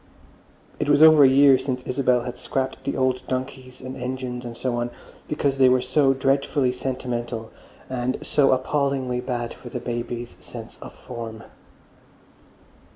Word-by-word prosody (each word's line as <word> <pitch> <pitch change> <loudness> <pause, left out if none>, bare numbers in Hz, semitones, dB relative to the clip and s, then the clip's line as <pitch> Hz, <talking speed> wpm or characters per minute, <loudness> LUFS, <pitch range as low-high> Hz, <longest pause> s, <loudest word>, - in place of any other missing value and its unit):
It - - -1
was 145 +1 +6
over 155 -2 +8
a 135 - +8
year 135 0 +6
since 130 -2 -3
Isabel 125 -1 +1
had 125 0 -5
scrapped 130 +1 -3
the 140 - -2
old 130 -1 +1
donkeys 130 0 -5
and 130 +1 -7
engines 125 -1 -4
and 120 -1 -7
so 125 -2 -2
on 120 0 -1 0.4
because 140 -2 -1
they 130 -1 +7
were 130 0 +4
so 135 +2 +2
"dreadfully 135 0 +1
sentimental" 120 -3 -4 0.4
and 130 0 -2
"so 140 -2 +3
appallingly 130 -1 0
bad 120 -2 -3
for 120 - -11
the 125 - -4
babies' 120 0 -5
sense - - -10
of - - -10
form." 115 -2 -8
130 Hz, 155 wpm, -24 LUFS, 125-135 Hz, 0.4 s, over